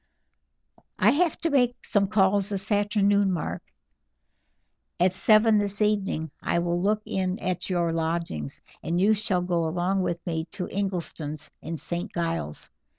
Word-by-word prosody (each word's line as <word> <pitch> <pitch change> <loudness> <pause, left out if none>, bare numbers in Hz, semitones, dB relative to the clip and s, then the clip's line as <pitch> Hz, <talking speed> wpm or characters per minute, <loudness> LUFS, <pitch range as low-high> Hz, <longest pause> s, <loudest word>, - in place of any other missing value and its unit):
"I - - +5
have 335 +1 +1
to 330 - 0
make 245 -3 +1
some 200 -2 +2
calls 200 0 +3
this 200 +1 -1
afternoon, 205 -1 +2
Mark. 170 -4 -3 1.4
At 180 +1 +4
seven 215 +3 +4
this 205 -1 -2
evening 200 -7 0
I - - 0
will 170 0 0
look 210 +2 +1
in 185 0 -1
at 180 -4 -3
your 170 -2 0
lodgings, 165 - -3 0.2
and 170 +1 -1
you 205 +4 +4
shall 200 -4 0
go 170 -2 0
along 180 +4 0
with 175 -2 -1
me 160 -2 -2
to 185 -3 -4
Ingleston's 165 -6 -4
in 165 +1 -5
St. 170 +4 -4
Giles'. 165 - -3
185 Hz, 150 wpm, -26 LUFS, 170-205 Hz, 1.4 s, I